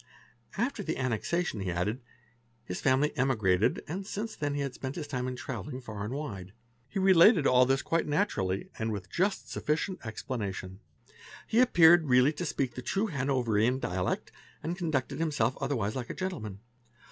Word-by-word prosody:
After 235 +1 -1
the 160 -5 -3
annexation, 130 - -1
he 95 -1 -2
added, 100 +9 -1 0.6
his 90 - -5
family 135 +2 +2
emigrated 110 -8 +2
and 190 +5 -5
since 215 +1 -4
then 145 -1 -2
he 145 - -1
had 140 -2 -3
spent 130 +2 -5
his 160 - -4
time 130 -3 -3
in 130 - -3
travelling 130 +2 -5
far 110 -5 -6
and 105 - -4
wide. 100 -10 -5 0.4
He - - -5
related 190 - +6
all 125 -1 +5
this 135 0 +2
quite 165 0 0
naturally 145 - -1
and 110 0 -1
with 100 -3 -6
just 195 +3 0
sufficient 160 +5 -2
explanation; 100 -5 -5 0.7
he 225 - +1
appeared 175 -9 +6
really 125 +4 +5
to 170 +2 -4
speak 130 -4 -1
the 125 - -6
true 195 - -1
Hanoverian 125 -3 +1
dialect, 90 -6 -2 0.3
and 170 +2 -2
conducted 160 -8 -2
himself 145 -7 +1
other 135 +1 0
wise 105 -3 -1
like 125 -3 -4
a - - -5
gentleman. 110 - -5
130 Hz, 170 wpm, -30 LUFS, 110-165 Hz, 0.7 s, related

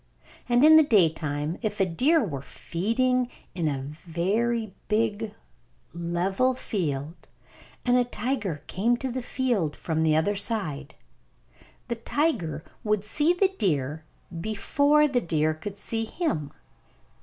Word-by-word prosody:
And 245 +4 +5
in 315 0 +9
the - - +9
daytime, 160 - +1
if 210 -3 -2
a 195 - +4
deer 270 - +3
were 140 -8 -4
feeding 240 - 0 0.2
in 170 -4 -1
a 135 -3 -2
very 190 - -1
big 215 0 0 0.6
level 180 +9 0
field, 160 - -3 0.6
and 245 0 +4
a 250 - +4
tiger 225 - -3
came 235 +6 +1
to 260 +1 -3
the 255 +1 -3
field 235 - -1
from 160 -1 -2
the 155 -1 +3
other 160 +6 +2
side, 160 - -2 0.9
the 235 -2 -3
tiger 205 - -1 0.2
would 210 -2 +1
see 295 +10 +2
the 375 +2 +3
deer 150 -4 0 0.5
before 285 +8 +3
the 255 -4 +1
deer 155 -3 +1
could 195 +6 -7
see 225 +2 -2
him. 215 - -2
205 Hz, 130 wpm, -26 LUFS, 160-245 Hz, 0.9 s, in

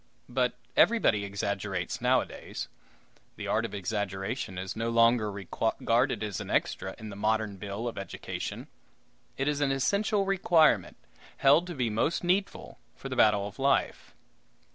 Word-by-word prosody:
But 125 0 0 0.2
everybody 210 - +4
exaggerates 100 -2 -3
nowadays. - - -1 0.7
The - - -6
art - - +1
of - - -6
exaggeration 100 +1 -3
is 95 +1 -4
no 115 +1 -1
longer 115 -2 +4
regarded 115 +5 0
as 105 -3 -3
an - - -7
"extra" 95 0 -1
in 110 -2 -8
the 100 - -8
modern 105 0 0
bill 100 +4 -5
of 115 - -4
education; 100 - -6 0.7
it 135 - -1
is 145 -1 0
an 145 - +2
essential 200 - +1
requirement, 175 -5 +3 0.4
held 145 +6 +5
to 175 - -6
be 125 -4 0
most 130 +12 0
needful 185 +3 -1 0.2
for - - -8
the - - -3
battle 105 -2 +4
of 105 - -12
life. 135 0 0
115 Hz, 145 wpm, -29 LUFS, 100-140 Hz, 0.7 s, held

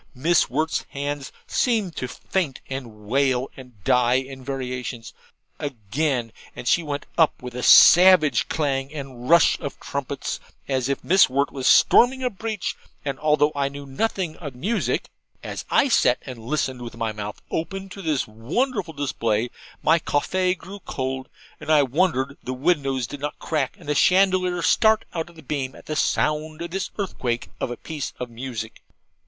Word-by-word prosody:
Miss 160 +4 +3
Wirt's 155 +5 0
hands 145 0 -4
seemed 220 -8 0
to 130 - -2
faint 150 0 -3
and 115 -6 -7
wail 130 +2 +1
and 125 -7 -14
die 125 +2 +3
in 130 0 -3
variations: 125 -3 -5 0.5
again, 125 0 -2 0.2
and - - -7
she 175 - +4
went 145 -3 -4
up 160 - +4
with 125 -1 -6
a 125 - -4
savage 175 +1 +7
clang 140 -3 -1
and 135 -4 -7
rush 170 -1 +5
of - - -6
trumpets, - - -4 0.3
as 130 -1 0
if 140 - -2
Miss 190 +3 +5
Wirt 140 +2 +1
was 130 -2 -2
storming 260 +2 +5
a 250 - 0
breach; 215 0 -3 0.3
and 140 -2 -3
although 150 -1 +3
I 140 -1 0
knew 140 0 -9
nothing 175 +3 -2
of 145 -6 -8
music, 200 - -1 0.4
as - - -5
I 280 - +4
sat 230 - +4
and 130 -3 -7
listened 130 +1 -2
with 115 -1 -8
my 115 -1 -1
mouth 105 0 -6
open 195 +4 -3
to 195 - -9
this 155 -6 0
wonderful 165 - -2
display, 115 -5 -1 0.3
my 165 +2 +5
CAFFY 180 +5 0
grew 190 +3 -10
cold, 130 -6 -4 0.3
and - - -9
I 150 -2 +6
wondered 140 -1 0
the 130 - -4
windows 135 -3 +1
did 145 +5 -8
not 145 +1 -4
crack 150 -5 -2
and - - -15
the 150 - +1
chandelier 185 +1 +3
start 220 0 +4
out 165 0 -3
of 170 - -18
the 160 - -13
beam 135 -2 -3
at - - -14
the 155 - -3
sound 155 +1 0
of 170 - -6
this 195 +2 -2
earthquake 125 - -2
of - - -2
a 120 - -5
piece 150 -3 -5
of 125 -1 -5
music. 115 -2 -6
140 Hz, 170 wpm, -24 LUFS, 130-170 Hz, 0.5 s, savage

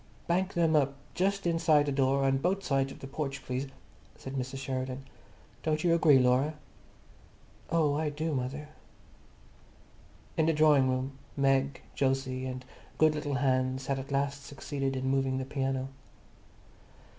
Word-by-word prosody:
"Bank 185 +3 0
them 165 -2 +3
up, 140 -2 +2 0.2
just 195 +1 0
inside 165 -3 +3
the 145 - -1
door, 135 0 +2
on 135 0 +2
both 190 +6 0
sides 135 -3 +1
of - - -12
the 135 - -6
porch, 140 0 -4
please," 130 +2 -2 0.5
said 135 - -8
Mrs. 130 0 -3
Sheridan. 130 0 -4 0.6
"Don't 155 -1 0
you 170 -1 +4
agree, 160 -4 +6
Laura?" 130 +4 +3 1.1
"Oh, 155 -3 +2
I 150 +1 0
do, 155 +2 -2
mother." 140 +3 -3 1.7
In 160 - +3
the 165 - +4
drawing 150 -4 +5
room 130 +1 -2 0.2
Meg, 135 0 +2 0.2
Jose 130 -1 0
and 130 -1 -5 0.3
good 155 -1 +5
little 150 -2 -2
Hans 130 -1 +1
had 135 0 -1
at 135 +2 -8
last 140 0 -1
succeeded 135 -1 -3
in 130 0 -2
moving 135 -1 +1
the 130 - -2
piano. 135 -1 -2
135 Hz, 150 wpm, -30 LUFS, 130-150 Hz, 1.7 s, agree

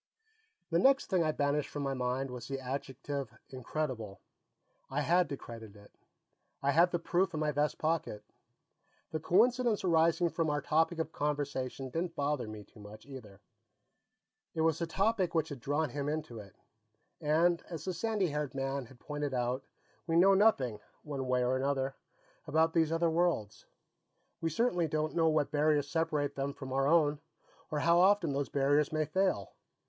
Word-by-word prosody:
The 165 - +3
next 270 +3 +3
thing 180 -3 +3
I 155 - +1
banished 145 0 0
from 145 - -4
my 135 -1 -1
mind 130 +1 -2
was 120 -1 -7
the 135 -1 -3
adjective 135 -2 -5
"incredible." 130 -5 -4 0.7
I 140 +2 -1
had 175 +4 +3
to 140 - -4
credit 115 -4 -10
it; 100 0 -16 0.7
I 140 - +3
had 170 +5 +5
the 175 - 0
proof 175 +1 0
in - - -2
my 155 -1 +1
vest 150 +1 0
pocket. 155 -10 -1 0.9
The 155 - -2
coincidence 235 +6 +3
arising 170 0 +3
from 160 +1 0
our 145 0 0
topic 160 +4 +1
of 160 -1 -2
conversation 140 -3 -3
didn't 165 +3 -3
bother 145 -5 -1
me 110 -1 -8
too 105 - -19
much, 105 +1 -12
either. 125 -8 -11 1.1
It 160 - 0
was 160 -1 +2
the 170 - -1
topic 190 0 +1
which 160 -1 +1
had 145 -3 -7
drawn 145 +3 -1
him 145 +1 -2
into 150 -7 -4
it. 100 -3 -12 0.6
And, 165 +3 +2
as 165 -3 -6
the 185 - -2
sandy 205 0 0
haired 150 -2 -3
man 135 -1 -2
had 130 -1 -17
pointed 145 -1 -4
out, 125 +2 -1 0.4
we 165 - 0
know 190 +3 +6
nothing, 140 - +3 0.2
one 140 -3 -4
way 125 0 +2
or 125 +1 +1
another, 135 0 0 0.5
about 160 +1 +2
these 160 -2 +2
other 165 0 +2
worlds; 165 -11 0 0.7
we 165 - 0
certainly 175 -1 +1
don't 155 0 -1
know 165 -1 +3
what 155 -2 +1
barriers 150 -1 +2
separate 150 -3 0
them 140 0 -3
from 130 -1 -7
our 135 +1 +2
own, 150 -2 +3 0.5
or 150 -1 -1
how 170 +2 +4
often 185 -5 +4
those 140 0 -2
barriers 145 +1 +2
may 155 -1 0
fail. 155 - 0
150 Hz, 175 wpm, -32 LUFS, 135-165 Hz, 1.1 s, know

